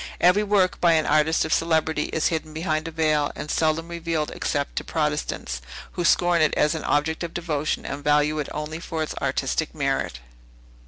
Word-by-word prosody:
Every 180 Hz, +4 st, +5 dB
work 200 Hz, -3 st, +2 dB
by 170 Hz, -1 st, +5 dB
an 155 Hz, -1 st, +2 dB
artist 155 Hz, +2 st, +3 dB
of 160 Hz, -, 0 dB
celebrity 160 Hz, -1 st, +1 dB
is 160 Hz, -, 0 dB
hidden 155 Hz, -1 st, -4 dB
behind 160 Hz, -1 st, -1 dB
a -, -, -5 dB
veil, 155 Hz, -2 st, +1 dB
and 150 Hz, -, -5 dB
seldom 160 Hz, +1 st, +1 dB
revealed, 165 Hz, -2 st, -2 dB
except 140 Hz, -1 st, -2 dB
to -, -, 0 dB
Protestants, 150 Hz, -, -2 dB, 0.3 s
who 175 Hz, -, -3 dB
scorn 175 Hz, 0 st, +3 dB
it 155 Hz, -, +3 dB
as 150 Hz, +1 st, +3 dB
an 160 Hz, -, -4 dB
object 160 Hz, +3 st, 0 dB
of 170 Hz, -, -6 dB
devotion, 155 Hz, -3 st, -2 dB
and 140 Hz, +1 st, -5 dB
value 150 Hz, +1 st, +2 dB
it 150 Hz, -, -3 dB
only 150 Hz, +2 st, -4 dB
for 165 Hz, -2 st, -3 dB
its 155 Hz, -, -4 dB
artistic -, -, -1 dB
merit. -, -, -1 dB
160 Hz, 190 wpm, -24 LUFS, 150-165 Hz, 0.3 s, Every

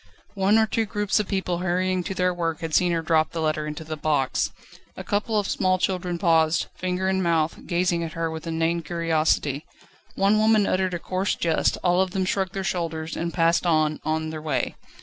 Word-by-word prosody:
One 200 Hz, +2 st, +3 dB
or 220 Hz, -, +5 dB
two 225 Hz, +1 st, -1 dB
groups 210 Hz, 0 st, 0 dB
of 210 Hz, -, -1 dB
people 185 Hz, -3 st, -1 dB
hurrying 185 Hz, 0 st, 0 dB
to 195 Hz, -, -4 dB
their 180 Hz, 0 st, +1 dB
work 165 Hz, -2 st, -2 dB
had 165 Hz, -1 st, -4 dB
seen 180 Hz, +3 st, +3 dB
her 165 Hz, -1 st, 0 dB
drop 160 Hz, -1 st, +2 dB
the 165 Hz, -, -3 dB
letter 155 Hz, -1 st, -1 dB
into 150 Hz, +1 st, -5 dB
the 155 Hz, 0 st, -5 dB
box. 150 Hz, -3 st, 0 dB, 0.5 s
A -, -, -6 dB
couple 210 Hz, +2 st, -1 dB
of 205 Hz, -1 st, 0 dB
small 185 Hz, 0 st, +1 dB
children 180 Hz, -1 st, -1 dB
paused, 165 Hz, -2 st, +3 dB
finger 185 Hz, 0 st, -2 dB
in 190 Hz, 0 st, +1 dB
mouth, 165 Hz, -2 st, 0 dB
gazing 175 Hz, -1 st, +1 dB
at 165 Hz, -, -5 dB
her 165 Hz, -1 st, -2 dB
with 160 Hz, 0 st, -7 dB
inane 165 Hz, +1 st, 0 dB
curiosity; 160 Hz, -3 st, 0 dB, 0.5 s
one 200 Hz, +2 st, +3 dB
woman 215 Hz, -1 st, +4 dB
uttered 185 Hz, -1 st, 0 dB
a -, -, -1 dB
coarse 185 Hz, +3 st, -1 dB
jest, 165 Hz, -2 st, +1 dB
all 180 Hz, 0 st, +3 dB
of 190 Hz, -, +1 dB
them 190 Hz, -2 st, 0 dB
shrugged 190 Hz, 0 st, -1 dB
their 195 Hz, -2 st, -3 dB
shoulders, 165 Hz, -3 st, -3 dB
and 170 Hz, 0 st, -2 dB
passed 170 Hz, +1 st, +2 dB
on, 155 Hz, -2 st, +2 dB
on 160 Hz, 0 st, -1 dB
their 155 Hz, -1 st, -6 dB
way. 155 Hz, -1 st, -1 dB
170 Hz, 210 wpm, -24 LUFS, 160-190 Hz, 0.5 s, or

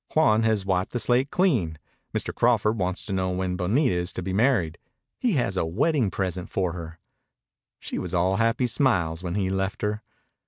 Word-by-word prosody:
"Juan 115 Hz, -9 st, +4 dB
has 110 Hz, -3 st, +1 dB
wiped 95 Hz, -1 st, 0 dB
the 120 Hz, -, 0 dB
slate 125 Hz, +3 st, +2 dB
clean. 120 Hz, -, +1 dB, 0.3 s
Mr. -, -, -2 dB
Crawford 115 Hz, -2 st, +2 dB
wants 90 Hz, 0 st, -1 dB
to 100 Hz, -, -4 dB
know 95 Hz, -1 st, 0 dB
when 90 Hz, 0 st, -1 dB
Bonita 100 Hz, -, +1 dB
is 90 Hz, 0 st, -1 dB
to 90 Hz, -, -4 dB
be 95 Hz, +1 st, -3 dB
married. 100 Hz, -, +2 dB, 0.4 s
He 245 Hz, -4 st, +1 dB
has 110 Hz, -, 0 dB
a -, -, +2 dB
wedding 120 Hz, -, +1 dB
present 90 Hz, -1 st, -3 dB
for 90 Hz, -3 st, -1 dB
her." 85 Hz, -1 st, -8 dB, 0.8 s
She -, -, -5 dB
was 90 Hz, -, -5 dB
all 90 Hz, +2 st, +2 dB
happy 115 Hz, +2 st, +2 dB
smiles 95 Hz, -, +1 dB
when 90 Hz, -1 st, -4 dB
he 95 Hz, -2 st, 0 dB
left 95 Hz, +1 st, -2 dB
her. 105 Hz, +1 st, -1 dB
95 Hz, 190 wpm, -25 LUFS, 90-120 Hz, 0.8 s, Juan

